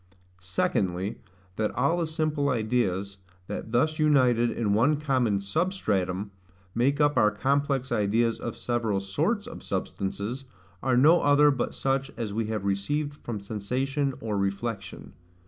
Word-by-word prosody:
Secondly, 95 +1 -1 0.4
That 110 -1 +1
all 170 - +2
the 170 -2 0
simple 155 -2 0
ideas, 105 -5 0 0.3
that 110 - -6
thus 155 +7 +1
united 130 -6 +4
in 110 -4 0
one 135 +8 +3
common 130 -8 +1
SUBSTRATUM, 100 - -1 0.4
make 135 +5 +1
up 145 -2 +3
our 105 -3 +5
complex 135 +3 0
ideas 110 +3 +1
of 115 -1 -5
several 115 -4 -1
SORTS 160 - -1
of 245 - -9
substances, 100 +6 -3 0.4
are 130 -1 +2
no 155 +7 +6
other 145 +1 +5
but 135 -3 -2
such 135 0 0
as 110 -4 -3
we 110 0 -1
have 110 -3 -3
received 145 +10 -1
from 115 -7 -5
sensation 130 +7 -2
or 105 -3 -2
reflection. 100 0 -4
120 Hz, 140 wpm, -27 LUFS, 100-145 Hz, 0.4 s, no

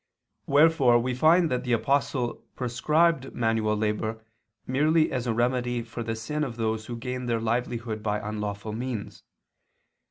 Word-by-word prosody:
Wherefore 140 -4 +5
we 125 +2 -1
find 160 +5 +4
that 125 - 0
the 125 -2 0
Apostle 130 -1 0
prescribed 135 +4 +1
manual 115 -2 +1
labor 110 +1 -2 0.4
merely 155 +5 +2
as 125 -2 -2
a 115 - +1
remedy 120 0 0
for 115 +1 -7
the 115 -1 -3
sin 150 +8 -3
of 125 -5 -4
those 110 -1 -2
who 120 - -5
gained 125 +1 -4
their 115 -1 +1
livelihood 115 -1 -2
by 105 0 0
unlawful 105 0 -4
means. 120 -2 -5
120 Hz, 150 wpm, -26 LUFS, 110-130 Hz, 0.4 s, Wherefore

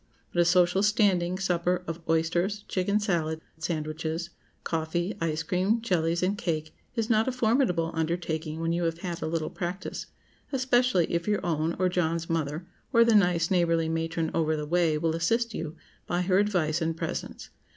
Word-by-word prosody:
But 175 - 0
a - - +4
social 180 +2 +4
standing 195 -4 +2
supper 180 -1 0
of 165 -1 -4
oysters, 175 +6 +1
chicken 200 +3 +1
salad, 165 -6 0 0.2
sandwiches, 160 +1 -3 0.3
coffee, 170 +4 -1
ice 160 -1 -1
cream, 190 +7 +1
jellies, 175 -6 0
and 190 +3 +1
cake, 155 -5 -3 0.2
is 225 -2 0
not 225 0 +3
a - - +2
formidable 225 -9 +1
undertaking 160 -1 -2
when 165 0 0
you 170 0 0
have 165 0 -1
had 175 -2 -4
a - - -2
little 160 0 -2
practice, 180 +1 -5 0.4
especially 250 - +3
if 170 +2 -1
your 210 -1 0
own, 160 0 0
or 185 - +2
John's 170 -2 -1
mother, 160 +1 -2 0.3
or 230 -2 +6
the 230 - +4
nice, 175 -4 +3
neighborly 165 -3 +2
matron 165 0 -1
over 160 -1 +1
the 150 -1 -3
way 165 -1 +2
will 160 +1 0
assist 230 +7 +1
you 160 0 -5 0.3
by 175 +1 0
her 185 +1 +3
advice 175 -6 +1
and 165 0 -1
presence. - - -5
170 Hz, 170 wpm, -28 LUFS, 165-190 Hz, 0.4 s, or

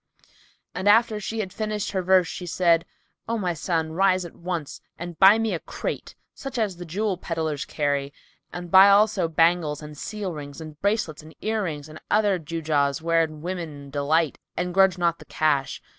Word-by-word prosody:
"[FN#293] - - -29 0.4
And 195 +2 +1
after 225 0 +4
she 220 +2 -4
had 190 -3 -6
finished 215 -1 -3
her 190 - -1
verse, 185 -1 +4
she 180 - -6
said, 170 -1 +2 0.4
"O 230 - 0
my 180 -5 -1
son, 160 0 -1
rise 185 +1 +2
at 170 - -10
once 170 -4 -5 0.2
and 175 -1 -7
buy 195 +3 +8
me 225 -2 0
a 170 - -2
crate, - - -5 0.2
such 270 -2 -7
as 205 -6 -1
the 175 - -7
jewel 195 +3 -1
pedlars 160 -4 -3
carry; 145 -2 -1 0.4
buy 190 +3 +6
also 200 -3 +4
bangles 165 -2 +2
and 150 0 -9
seal 200 +3 -5
rings 145 -1 -8
and 155 -2 -10
bracelets 200 -7 0
and 155 +1 -15
ear 220 0 0
rings 150 -3 -5
and 155 0 -11
other 205 -3 +3
gewgaws 150 -3 0
wherein 160 -2 0
women 160 -6 -6
delight 150 +2 +1 0.2
and 180 0 -2
grudge 190 -1 +4
not 170 -1 +1
the - - -13
cash. 145 -4 0
175 Hz, 185 wpm, -25 LUFS, 155-195 Hz, 0.4 s, buy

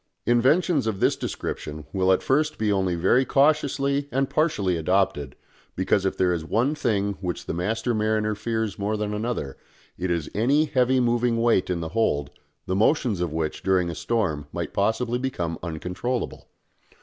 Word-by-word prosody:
Inventions 135 +4 +3
of 105 -4 -2
this - - +3
description 75 0 -5
will 95 -1 +2
at 95 - +2
first 150 +3 +1
be 110 -1 +1
only 95 -3 +1
very 120 +10 +3
cautiously 140 0 +2
and 135 +2 +1
partially 105 - +1
adopted, 80 -5 0 0.4
because 95 +1 +1
if - - -3
there 90 -1 +2
is 85 -2 -3
one 120 - +1
thing 100 -9 -1
which 90 -2 -4
the - - -3
master 110 +7 -1
mariner 110 0 +1
fears 110 -2 -3
more 105 +2 -1
than 105 0 -2
another 105 - -3 0.4
it 90 +1 -1
is 85 -4 -1
any 135 +9 +3
heavy 130 -3 +2
moving 120 -1 +1
weight 115 -6 +2
in 90 -2 -1
the 80 - -4
hold, 75 -8 0 0.3
the 95 - -1
motions 110 - +2
of 85 -3 -1
which 80 -1 -3
during 90 -3 +1
a - - -5
storm 80 -10 -1
might - - -4
possibly 115 +4 0
become 90 -11 -3
uncontrollable. 90 +9 -4
105 Hz, 170 wpm, -25 LUFS, 90-125 Hz, 0.4 s, Inventions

